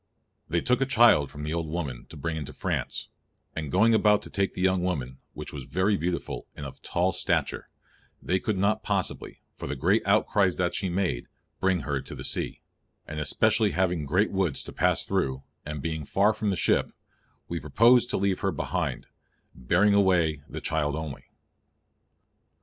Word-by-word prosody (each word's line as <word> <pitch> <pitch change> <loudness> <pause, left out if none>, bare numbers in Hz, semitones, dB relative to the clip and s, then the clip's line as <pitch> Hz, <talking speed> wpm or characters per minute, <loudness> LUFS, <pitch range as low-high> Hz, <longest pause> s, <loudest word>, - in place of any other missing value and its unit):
_They 85 +1 0
took 125 +1 +2
a 135 - +2
child 120 - +5
from 75 - -8
the 75 +1 -3
old 85 -1 -2
woman 75 -7 -4
to 80 - -9
bring 80 +3 -3
into 75 -3 -5
France; - - -3 0.5
and 80 -3 -4
going 110 +5 +4
about 105 -1 +4
to - - -10
take 100 -1 -1
the - - -4
young 95 -1 +2
woman, 65 -8 -3 0.2
which - - -7
was - - -6
very 95 +9 +1
beautiful, 90 -1 -3
and 70 - -7
of 70 - -10
tall 90 +2 0
stature_, - - -1 0.5
they 95 +2 0
could 105 +1 -2
not 105 +3 +1
possibly, 100 -4 -2
for - - -7
the - - -3
great 95 +7 +2
outcries 100 -2 +3
that 90 -1 0
she 95 - -1
made, 85 -9 -1 0.3
bring 95 -2 +1
her 70 -2 -2
to - - -9
the - - -7
sea; - - -2 0.4
and 75 0 -6
especially 105 +8 +3
having 90 -4 0
great 90 +9 +2
woods 95 -8 0
to - - -9
pass - - +2
thorow, 65 0 -1 0.2
and 75 -2 -5
being 80 -2 -3
far 100 +9 +2
from 105 0 -2
the 95 - +1
ship, - - +2 0.6
we - - -3
proposed 120 +1 +4
to - - 0
leave 95 -1 0
her 100 - 0
behind, 75 - -3 0.5
bearing 90 +12 +2
away 90 -7 +3
the - - -6
child 75 -2 0
only." 80 -3 -6
90 Hz, 185 wpm, -27 LUFS, 75-100 Hz, 0.6 s, child